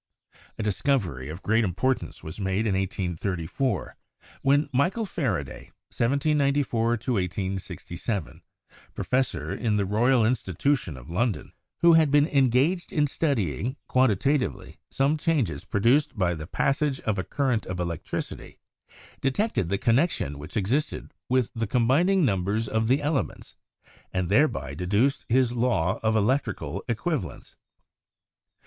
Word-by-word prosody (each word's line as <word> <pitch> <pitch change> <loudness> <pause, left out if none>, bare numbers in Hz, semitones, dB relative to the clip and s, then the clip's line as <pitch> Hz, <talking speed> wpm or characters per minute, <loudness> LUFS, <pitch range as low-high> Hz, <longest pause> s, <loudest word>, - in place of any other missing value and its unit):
A 110 - -3
discovery 95 - 0
of 80 +5 -8
great 115 +2 +3
importance 110 +7 -1
was 80 +6 -8
made 95 +2 0
in 105 - +1
1834, 95 - -2 0.5
when 145 +2 +3
Michael 180 - +1
Faraday 105 - -3 0.3
(1794 140 -2 +1
1867), 95 - -3 0.5
professor 100 - -1
in 110 -3 0
the 100 - +1
Royal 115 +4 +3
Institution 110 - 0
of 65 +1 -12
London, 105 +4 -1 0.3
who 170 0 +7
had 160 -2 +5
been 145 +1 +5
engaged 140 +6 +2
in 150 -2 +2
studying 125 - -1
quantitatively 130 +3 +1
some 140 +3 +1
changes 125 - 0
produced 120 +6 +2
by 90 -3 +2
the 80 -1 -7
passage 135 - 0
of 105 -3 -1
a - - -1
current 130 -3 -1
of 95 -1 -4
electricity, 85 -2 -5 0.6
detected 135 - 0
the 100 - +1
connection 115 - +1
which 75 +8 -6
existed 130 - -1 0.2
with 125 -2 +2
the 115 -2 -2
combining 150 - +3
numbers 105 +1 0
of 110 0 0
the 135 +4 +2
elements, 145 -1 -2 0.6
and 90 -2 -1
thereby 100 - +2
deduced 105 - 0
his 125 0 +3
law 115 -8 +1
of 110 0 +1
electrical 120 +7 0
equivalents. 115 - -3
115 Hz, 125 wpm, -26 LUFS, 95-140 Hz, 0.6 s, who